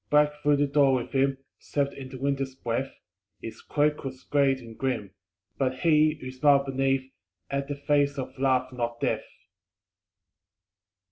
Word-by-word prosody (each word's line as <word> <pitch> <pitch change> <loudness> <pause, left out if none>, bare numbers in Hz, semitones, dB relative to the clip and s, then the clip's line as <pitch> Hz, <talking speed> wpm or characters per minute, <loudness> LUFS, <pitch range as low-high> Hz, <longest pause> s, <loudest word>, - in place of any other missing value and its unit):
_ - - -44
Black 150 0 +4
through 145 0 +4
the 145 - +3
door 140 -1 +4
with 125 - -3
him 135 0 +2 0.2
Swept 140 -1 -1
in 135 -1 -8
the 130 - -8
Winter's 135 0 -1
breath; 130 +1 -2 0.5
His 115 - -8
cloak 150 0 0
was 130 -1 -7
great 140 -2 +2
and 115 -2 -11
grim 115 -7 -2 0.5
But 130 -1 -1
he, 155 -2 +4
who 130 -2 -6
smiled 140 +1 +4
beneath, 135 0 0 0.4
Had 140 0 -1
the 145 - -3
face 140 0 +1
of 130 -1 -4
Love 130 -1 +1
not 120 -1 -3
Death. - - -1
135 Hz, 160 wpm, -27 LUFS, 130-145 Hz, 0.5 s, Black